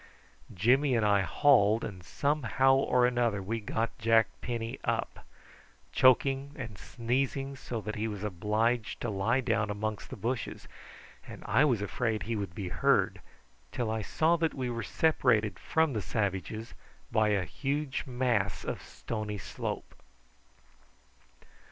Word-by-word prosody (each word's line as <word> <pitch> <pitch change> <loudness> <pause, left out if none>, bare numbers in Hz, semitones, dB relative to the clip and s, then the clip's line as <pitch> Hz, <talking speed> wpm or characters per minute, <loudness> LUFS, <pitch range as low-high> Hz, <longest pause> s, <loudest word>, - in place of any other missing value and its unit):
Jimmy 125 - +3
and 110 -2 +2
I 100 -1 +4
hauled, 115 -2 +4
and 95 -4 -6
somehow 135 - +2
or 125 -2 +3
another 120 -4 +1
we 110 +4 -3
got 110 +3 -3
Jack 115 -1 +4
Penny 115 -1 -4
up, - - -2 0.6
choking 135 +2 +3
and 120 -7 -6
sneezing, 135 +6 -2
so 120 -3 -5
that 110 0 -4
he 110 +1 -2
was 105 -2 -5
obliged 110 +4 0
to 115 - -2
lie 100 +6 +1
down 115 -4 0
amongst 105 0 -3
the - - -6
bushes, 120 +1 -4 0.6
and - - -10
I 150 - +4
was 120 -8 +1
afraid 110 -1 -1
he 115 +4 -2
would 100 -5 -4
be 95 -3 -4
heard, - - +2 0.5
till 120 -3 -2
I 110 0 -1
saw 160 +10 +2
that 165 -1 0
we 130 -3 -2
were 115 0 -3
separated 110 - +2
from 160 -3 +1
the 110 - -1
savages 105 +2 -3 0.4
by 110 -2 +3
a 100 -3 +1
huge 140 +3 -2
mass 115 -8 0
of - - -3
stony 110 -2 -5
slope. - - -5
115 Hz, 145 wpm, -30 LUFS, 105-130 Hz, 0.6 s, I